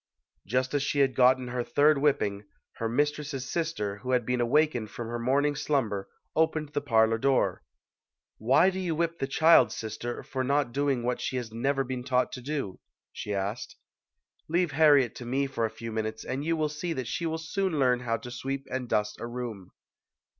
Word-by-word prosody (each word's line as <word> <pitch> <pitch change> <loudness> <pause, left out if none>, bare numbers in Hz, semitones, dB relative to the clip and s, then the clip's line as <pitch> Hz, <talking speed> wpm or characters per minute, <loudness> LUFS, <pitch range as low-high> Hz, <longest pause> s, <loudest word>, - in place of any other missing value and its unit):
Just 130 +5 0
as 145 - +2
she 145 +1 +1
had 135 -1 +3
gotten 130 0 +4
her 125 0 -2
third 145 +3 +3
whipping, 105 -8 +1 0.3
her 115 - -2
mistress's 145 +1 -1
sister, 130 -12 -2
who 125 +5 -3
had 125 -2 +2
been 125 0 0
awakened 120 -3 +2
from 115 +2 -6
her 120 0 -3
morning 140 +4 +2
slumber, 110 -10 -1 0.3
opened 160 -2 +1
the 145 - -2
parlor 115 -4 +3
door. 135 +2 +1 0.8
"Why 135 - +4
do 190 - -4
you 175 -4 -1
whip 170 +1 -1
the 135 - -1
child, 140 -5 +5
sister, 115 +2 -5
for 130 -1 -3
not 140 -1 +1
doing 140 -2 0
what 125 +1 -1
she 130 - -2
has 120 -3 -4
never 135 +4 0
been 125 -1 -4
taught 125 0 +1
to 125 - -7
do?" 135 -8 -4 0.3
she 105 - -6
asked. 100 +4 -3 0.7
"Leave 175 0 +1
Harriet 145 -5 +5
to 120 - -7
me 135 +3 +1
for 130 -4 -1
a - - -1
few 115 +1 -7
minutes 110 0 -3
and 135 +2 -3
you 165 +1 0
will 155 -1 +1
see 160 +3 -3
that 130 -4 -4
she 165 +8 -2
will 160 0 -2
soon 165 +1 -2
learn 125 -3 +3
how 115 -2 -1
to 120 +2 -9
sweep 135 +2 -4
and 130 -2 -3
dust 105 0 0
a 115 - -3
room." 120 -6 -6
130 Hz, 195 wpm, -28 LUFS, 115-145 Hz, 0.8 s, child